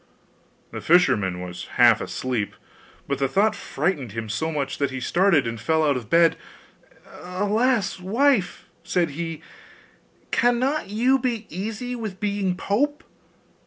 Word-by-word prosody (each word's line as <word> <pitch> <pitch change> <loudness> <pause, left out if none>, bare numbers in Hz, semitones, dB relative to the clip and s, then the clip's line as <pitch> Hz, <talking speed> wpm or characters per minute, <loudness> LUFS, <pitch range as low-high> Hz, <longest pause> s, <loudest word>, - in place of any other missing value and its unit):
The - - -6
fisherman 105 - +3
was 90 -1 -7
half - - +6
asleep, 125 -5 -3 0.5
but 140 -1 -2
the 135 - +2
thought 200 +10 +2
frightened 145 - -2
him 115 -1 -5
so 160 +9 -2
much 140 -3 -3
that 140 -1 +1
he 130 0 -5
started 170 0 +3
and 115 -2 -4
fell 160 +2 +1
out 145 -2 +2
of 120 -4 -6
bed. 170 0 +4 0.7
'Alas, 205 +3 -1
wife!' 225 +2 +1 0.2
said 175 -4 0
he, 165 +1 -5 0.9
'cannot 245 +3 +1
you 250 +6 +2
be 235 -4 -2
easy 220 +8 -4
with 215 -5 -6
being 200 -3 -1
pope? 290 - 0
180 Hz, 135 wpm, -24 LUFS, 140-220 Hz, 0.9 s, half